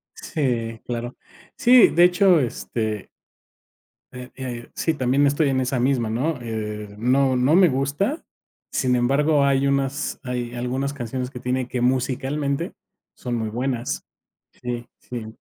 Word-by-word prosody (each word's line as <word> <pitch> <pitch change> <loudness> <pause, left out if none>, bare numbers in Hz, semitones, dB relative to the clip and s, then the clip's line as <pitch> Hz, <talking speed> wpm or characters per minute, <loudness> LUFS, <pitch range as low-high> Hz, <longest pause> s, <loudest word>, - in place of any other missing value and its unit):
Sí, 115 -6 -2
claro. 120 0 -4 0.4
Sí, 245 0 +7
de 175 - +4
hecho, 180 -1 +5
este 110 -4 -3 1.0
Eh, 125 0 -9
eh, 120 -3 -6
sí, 165 - 0
también 135 0 +2
estoy 145 +1 +2
en 130 -1 +1
esa 130 0 -1
misma, 125 -3 +1
¿no?, 130 +6 -1
eh, 105 -2 -5
no 130 +3 +2
no 130 +5 +3
me 185 -1 +6
gusta. 145 - -1 0.5
Sin 125 -1 +1
embargo, 140 +4 +3
hay 140 0 +2
unas 140 +1 -1
hay 125 -2 -3
algunas 130 +3 -2
canciones 125 -1 -4
que 125 - -9
tiene 125 0 -1
que 125 -1 -3
musicalmente, 135 +3 0 0.4
son 120 -1 -4
muy 110 -2 -2
buenas. 125 +1 -2 0.5
Sí, 120 -1 -5
sí. 120 -3 -7
130 Hz, 140 wpm, -23 LUFS, 120-140 Hz, 1.0 s, Sí